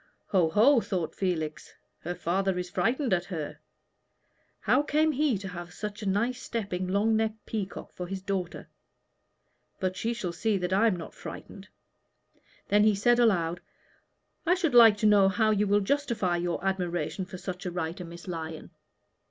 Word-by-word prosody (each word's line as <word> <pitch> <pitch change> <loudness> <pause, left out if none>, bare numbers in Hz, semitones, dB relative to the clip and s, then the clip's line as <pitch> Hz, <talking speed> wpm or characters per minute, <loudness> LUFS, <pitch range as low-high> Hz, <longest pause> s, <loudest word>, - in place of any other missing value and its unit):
"Ho, 180 -5 +3
ho!" 235 - +5
thought 180 -7 -3
Felix, 160 -5 -3 0.2
"her 175 +2 -5
father 190 +2 0
is 180 0 -4
frightened 250 0 +1
at 175 -1 +1
her. 160 -6 -5 1.0
How - - +3
came 305 +2 +2
he 290 -5 +1
to 195 0 -7
have 175 -1 -8
such 210 +2 -6
a 205 - -4
nice 235 +6 0
stepping, 195 -5 -3
long 205 +4 +2
necked 220 -1 -1
peacock 205 -3 -5
for 180 - -6
his 190 0 -5
daughter? 190 -3 -3 1.1
but 185 -1 -1
she 230 +4 -2
shall 185 -7 -4
see 215 +4 0
that 180 0 -2
I 210 +4 +4
am 210 - +2
not 170 -2 -8
frightened." - - -10 1.0
Then 205 +1 +5
he 215 -1 +4
said 240 +5 +3
aloud, 180 -7 +2 0.8
"I 350 +2 +3
should 335 -7 0
like 225 -3 +8
to 215 - -1
know 205 -2 +6
how 215 +3 +2
you 210 0 +2
will 205 +1 +3
justify 220 -6 0
your 175 +1 -2
admiration 180 -2 -1
for 185 0 -9
such 185 +1 -6
a - - -3
writer, 175 +1 -4
Miss 170 +2 -11
Lyon." 160 -2 -6
195 Hz, 170 wpm, -28 LUFS, 180-220 Hz, 1.1 s, like